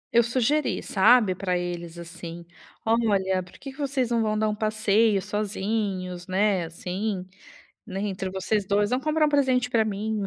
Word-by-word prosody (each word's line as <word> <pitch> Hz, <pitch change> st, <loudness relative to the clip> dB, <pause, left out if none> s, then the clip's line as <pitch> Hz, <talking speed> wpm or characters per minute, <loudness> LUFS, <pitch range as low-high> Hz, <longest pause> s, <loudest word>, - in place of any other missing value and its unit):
Eu 235 Hz, -, +8 dB
sugeri, 255 Hz, +5 st, 0 dB
sabe, 215 Hz, 0 st, +4 dB
pra 180 Hz, -1 st, -1 dB
eles, 175 Hz, -1 st, -5 dB
assim: 170 Hz, 0 st, -8 dB, 0.4 s
"Olha, 200 Hz, -5 st, +2 dB
por 180 Hz, 0 st, -14 dB
que 275 Hz, -, -8 dB
que 265 Hz, -, -17 dB
vocês 265 Hz, -4 st, -1 dB
não 235 Hz, -1 st, +2 dB
vão 215 Hz, -1 st, 0 dB
dar 215 Hz, 0 st, +1 dB
um 210 Hz, -, 0 dB
passeio 215 Hz, 0 st, +2 dB
sozinhos, 200 Hz, -3 st, -2 dB
né, 190 Hz, -1 st, +1 dB
assim, 185 Hz, +3 st, -4 dB, 0.6 s
né, 195 Hz, -4 st, -6 dB
entre 190 Hz, -2 st, -3 dB
vocês 190 Hz, +3 st, -1 dB
2, 205 Hz, +1 st, +2 dB
vão 250 Hz, -, +2 dB
comprar 305 Hz, +2 st, +2 dB
um -, -, +2 dB
presente 260 Hz, -4 st, +2 dB
pra 225 Hz, -3 st, +4 dB
mim. 215 Hz, 0 st, -2 dB
210 Hz, 170 wpm, -25 LUFS, 185-230 Hz, 0.6 s, Eu